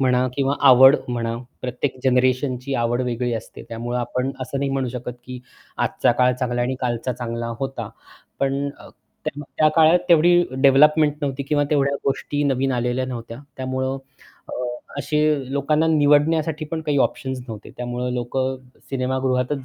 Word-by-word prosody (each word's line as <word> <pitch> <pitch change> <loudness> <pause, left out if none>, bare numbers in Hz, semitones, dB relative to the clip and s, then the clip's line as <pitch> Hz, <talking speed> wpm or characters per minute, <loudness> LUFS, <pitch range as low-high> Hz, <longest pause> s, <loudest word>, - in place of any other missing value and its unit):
म्हणा 125 -1 +3
किंवा 140 0 +1
आवड 130 +2 +8
म्हणा. 115 -1 -2 0.2
प्रत्येक 125 +2 -3
जनरेशनची 130 +1 +1
आवड 120 +1 0
वेगळी 120 0 -2
असते. 110 - -7
त्यामुळे 120 +2 -3
आपण 125 +2 -2
असं 130 +2 -4
नाही 140 0 -1
म्हणू 135 -2 -1
शकत 125 0 -5
की 125 0 -7 0.5
आजचा - - +2
काळ 125 +1 +3
चांगला 125 -1 -2
आणि 125 +2 -1
कालचा 125 0 -1
चांगला 115 -1 -4
होता. 135 -5 -4 0.5
पण 135 0 +1 0.2
अ, - - -13 0.4
तेव्हा 145 +1 -4
त्या 155 - +6
काळात 160 +2 +6
तेवढी 175 +1 +6 0.2
डेव्हलपमेंट 150 +2 +5
नव्हती 140 -1 -2
किंवा 145 +1 +1
तेवढ्या 140 -2 +2
गोष्टी 145 +1 -1
नवीन 135 -1 +1
आलेल्या 125 +1 0
नव्हत्या. 115 -2 -7 0.2
त्यामुळं 130 +1 -2 0.5
अ, - - -8 0.5
असे 150 -2 0
लोकांना 150 +3 +1
निवडण्यासाठी 155 +1 +3
पण 165 -1 -2
काही 150 -2 0
ऑप्शन्स 130 -1 -6
नव्हते, 110 -2 -8
त्यामुळं 125 0 -3
लोक 120 +1 -4 0.5
सिनेमागृहातच 130 +1 -1
130 Hz, 150 wpm, -22 LUFS, 125-145 Hz, 0.5 s, आवड